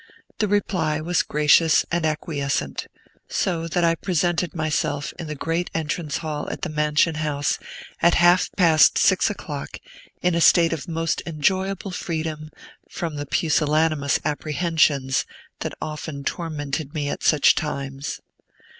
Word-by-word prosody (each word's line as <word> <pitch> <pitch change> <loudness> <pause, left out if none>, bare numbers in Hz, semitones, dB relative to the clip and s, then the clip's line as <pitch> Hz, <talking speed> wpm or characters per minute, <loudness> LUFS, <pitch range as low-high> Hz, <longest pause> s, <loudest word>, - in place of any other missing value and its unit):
The 215 - +2
reply 180 -6 0
was 170 +2 +1
gracious 150 +2 +4
and 170 -2 +1
acquiescent; 140 - -2 0.4
so 165 -3 -1
that 175 +2 0
I 165 0 +4
presented 175 -1 -1
myself 155 -2 -1
in 165 - -5
the 150 - -4
great 165 +4 -2
entrance 155 -1 -2
hall 150 -1 -3
of - - -5
the 180 - -2
Mansion 150 +1 +2
House, 145 -2 -1 0.4
at 170 - +5
half 175 +1 +4
past 165 -5 +5
six - - +4
o'clock, - - -6 0.5
in 180 0 +3
a 170 - +1
state 165 0 +5
of 165 +2 -5
most 165 -1 -1
enjoyable 190 +5 -1
freedom 155 -3 -4 0.4
from 165 -2 -4
the 145 0 -5
pusillanimous 155 -2 +1
apprehensions 150 -3 +1 0.4
that - - -5
often 150 -2 -6
tormented 150 -2 -4
me 145 -2 -1
at - - -4
such 150 -3 +5
times. 140 -1 -4
155 Hz, 135 wpm, -23 LUFS, 150-170 Hz, 0.5 s, at